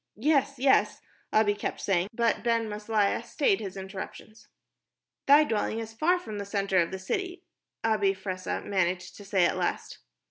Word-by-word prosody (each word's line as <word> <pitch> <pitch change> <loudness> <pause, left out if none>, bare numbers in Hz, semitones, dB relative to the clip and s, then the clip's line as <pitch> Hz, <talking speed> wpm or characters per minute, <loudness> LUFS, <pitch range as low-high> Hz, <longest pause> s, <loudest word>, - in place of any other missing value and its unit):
"Yes, 275 +3 +2
yes," 265 +2 +3 0.3
Abi 215 -1 +3
kept 205 - -4
saying, 185 -2 +1
but 230 0 0
Ben 230 -1 +1
Maslia 210 -1 0
stayed 400 -5 +1
his 195 -1 -6
interruptions. 195 +3 -9 0.8
"Thy 290 +2 +8
dwelling 220 -5 -1
is 225 -1 -6
far 330 +10 +2
from 215 - -7
the - - -3
center 200 -2 +1
of 170 - +2
the 190 - -5
city," 360 - -4 0.4
Abi 210 -3 +2
Fressah 185 -1 -4
managed 185 -2 -1
to 205 - -11
say 195 -3 +2
at - - 0
last. - - -3
210 Hz, 165 wpm, -28 LUFS, 195-235 Hz, 0.8 s, Thy